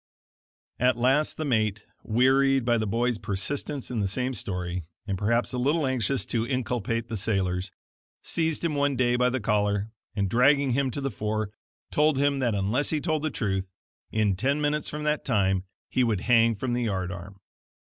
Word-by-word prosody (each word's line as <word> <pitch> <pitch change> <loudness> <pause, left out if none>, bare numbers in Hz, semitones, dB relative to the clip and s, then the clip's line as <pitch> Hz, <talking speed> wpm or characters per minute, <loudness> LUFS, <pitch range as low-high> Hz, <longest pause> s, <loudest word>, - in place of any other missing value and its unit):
At 125 0 +3
last 135 +5 +2
the 155 - -2
mate, 110 -5 0 0.2
wearied 135 +2 +3
by 120 -1 +3
the 110 - -1
boy's 120 +2 0
persistence 135 +8 -3
in 120 - -1
the 100 - +1
same 125 +6 -2
story, 90 -4 -3 0.2
and 100 -2 -2
perhaps 115 +6 0
a 125 - -1
little 145 +4 +2
anxious 130 0 0
to 115 -2 -1
inculpate 120 -3 -1
the 115 - -4
sailors, 95 -3 0 0.5
seized 160 0 -1
him 165 - 0
one 145 -1 +1
day 120 -1 +2
by 125 0 +3
the 130 +1 -1
collar, 105 -1 0 0.2
and 100 -2 +1
dragging 135 +6 +4
him 135 +2 +1
to 140 - -4
the 135 -1 -2
fore, 110 0 -2 0.4
told 150 -1 +3
him 140 0 +2
that 120 -5 +1
unless 105 +9 +1
he 155 - +2
told 155 -1 -1
the 155 - 0
truth, 95 -5 -2 0.4
in 105 -3 +2
ten 135 +9 +1
minutes 150 0 0
from 150 0 -5
that 150 0 0
time 95 -6 +1 0.2
he 130 - +1
would 110 -6 +1
hang 115 -1 +4
from 120 +4 -2
the 120 - 0
yard 95 -4 -2
arm. 90 +2 -9
120 Hz, 185 wpm, -27 LUFS, 105-135 Hz, 0.5 s, dragging